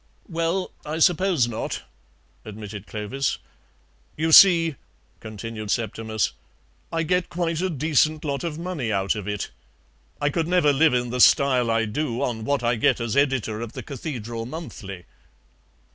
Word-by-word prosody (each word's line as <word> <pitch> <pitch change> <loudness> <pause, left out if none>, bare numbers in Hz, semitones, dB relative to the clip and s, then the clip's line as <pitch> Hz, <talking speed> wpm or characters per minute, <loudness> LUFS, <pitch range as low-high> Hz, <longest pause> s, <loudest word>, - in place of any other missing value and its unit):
"Well, 170 +1 -1
I 155 +1 -4
suppose 175 -5 +3
not," 115 -2 -4 0.6
admitted 105 -1 -8
Clovis. 110 +6 -2 0.8
"You 160 +1 0
see," 165 -2 +8 0.5
continued 110 0 -7
Septimus, 110 -1 -1 0.6
"I 165 0 0
get 180 +2 0
quite 170 -1 -1
a 185 - 0
decent 155 0 +1
lot 140 0 -2
of 165 -3 -3
money 165 -9 -3
out 100 -1 +1
of 105 -2 -6
it. 105 -1 -3 0.7
I 145 0 +1
could 165 +2 -1
never 175 -5 +3
live 150 -1 +4
in 120 -1 -1
the 125 0 0
style 130 -4 +5
I 115 0 +2
do 120 +2 -2
on 110 -3 -2
what 140 -1 0
I 120 0 +1
get 110 - +2
as 115 0 -2
editor 130 -6 +1
of 115 -1 -6
the - - -7
CATHEDRAL 120 -5 -5
MONTHLY." 105 - -8
135 Hz, 150 wpm, -24 LUFS, 110-160 Hz, 0.8 s, see